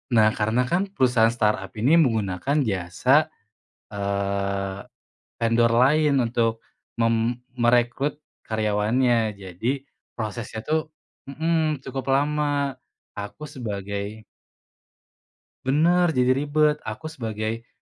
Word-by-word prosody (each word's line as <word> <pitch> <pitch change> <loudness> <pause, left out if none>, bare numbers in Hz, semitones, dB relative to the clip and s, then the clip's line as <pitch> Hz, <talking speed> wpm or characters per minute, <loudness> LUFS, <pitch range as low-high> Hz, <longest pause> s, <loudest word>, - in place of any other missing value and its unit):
Nah, 110 -1 +5
karena 110 +4 +1
kan 180 +8 0
perusahaan 125 - +3
startup 105 -4 0
ini 125 +9 +3
menggunakan 110 - 0
jasa, 90 -4 +2 0.6
eee, 100 -1 -2 0.6
vendor 115 0 +3
lain 140 +5 +4
untuk 115 -1 0 0.4
mem 115 +1 +1 0.2
merekrut 120 +4 +1 0.3
karyawannya 110 +2 +1
jadi 115 +9 -3 0.3
prosesnya 110 0 -4
tuh 155 0 0 0.4
mhm, 160 0 0
cukup 135 -1 -4
lama 145 0 +1 0.4
aku 105 +8 -7
sebagai 100 -2 -5 1.4
Benar, 165 +5 +3
jadi 125 0 +3
ribet 150 +1 +2
aku 110 +9 -5
sebagai, 115 -3 -4
115 Hz, 95 wpm, -24 LUFS, 105-140 Hz, 1.4 s, Nah